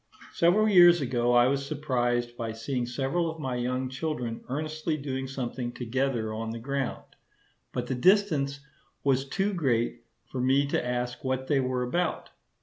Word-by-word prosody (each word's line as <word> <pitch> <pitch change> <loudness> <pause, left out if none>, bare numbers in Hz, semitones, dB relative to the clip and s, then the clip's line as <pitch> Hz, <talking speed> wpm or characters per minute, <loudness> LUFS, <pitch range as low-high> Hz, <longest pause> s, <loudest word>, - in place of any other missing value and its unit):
Several 190 +6 +4
years 175 -4 +7
ago 120 -3 +1
I 120 0 +6
was 140 +2 +1
surprised 120 -5 -1
by 115 -2 -4
seeing 120 +2 -3
several 135 +7 -1
of 160 0 -7
my 130 -4 -2
young 125 +1 -1
children 130 -4 -4
earnestly 155 +3 -2
doing 135 -2 -4
something 125 -2 -4
together 120 -2 -1
on 110 +1 -4
the 115 - -4
ground; 135 +2 -3 0.7
but 125 - -3
the 130 - -2
distance 140 -3 +2 0.4
was 135 -1 +1
too 195 +6 0
great 120 -8 0 0.3
for 130 - -2
me 135 +2 +3
to - - 0
ask 125 0 -3
what 130 0 -1
they 140 0 +2
were 130 -1 0
about. 165 +7 -1
130 Hz, 160 wpm, -28 LUFS, 120-150 Hz, 0.7 s, years